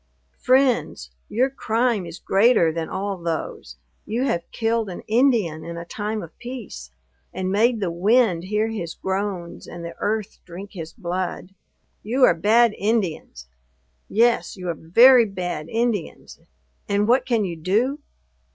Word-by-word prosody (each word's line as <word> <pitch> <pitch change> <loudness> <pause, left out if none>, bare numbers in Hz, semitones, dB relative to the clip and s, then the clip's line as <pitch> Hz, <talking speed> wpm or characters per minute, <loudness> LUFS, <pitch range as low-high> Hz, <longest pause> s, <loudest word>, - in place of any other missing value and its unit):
"Friends! 255 - +1 0.2
your 255 +4 +1
crime 230 -6 0
is 170 +1 -8
greater 195 -5 +3
than 160 0 -4
all 195 0 -3
those: 165 - -5 0.3
you 235 +4 -2
have 175 -11 -1
killed 225 -2 -1
an 180 - -7
Indian 220 - +1
in 170 0 -7
a 170 - -6
time 210 +3 -4
of 165 - -12
peace; 240 - -8 0.4
and 185 0 -3
made 225 +3 +2
the 190 -4 -1
wind 190 0 +2
hear 210 +3 0
his 175 -7 -5
groans, 190 -3 -4
and 170 -1 -8
the 170 - -6
earth 215 0 -2
drink 190 +3 -10
his 165 -4 -7
blood. 180 0 -4 0.5
You 250 +5 0
are - - +7
bad 220 +6 +3
Indians! 185 - -2 0.6
Yes, 235 -1 +2
you 180 -1 -5
are - - 0
very 235 +10 +6
bad 180 -5 -5
Indians; 225 -6 -2 0.5
and 205 +1 +1
what 250 +3 +4
can 230 -5 +1
you 175 -2 -4
do? 220 - 0
200 Hz, 150 wpm, -23 LUFS, 170-230 Hz, 0.6 s, are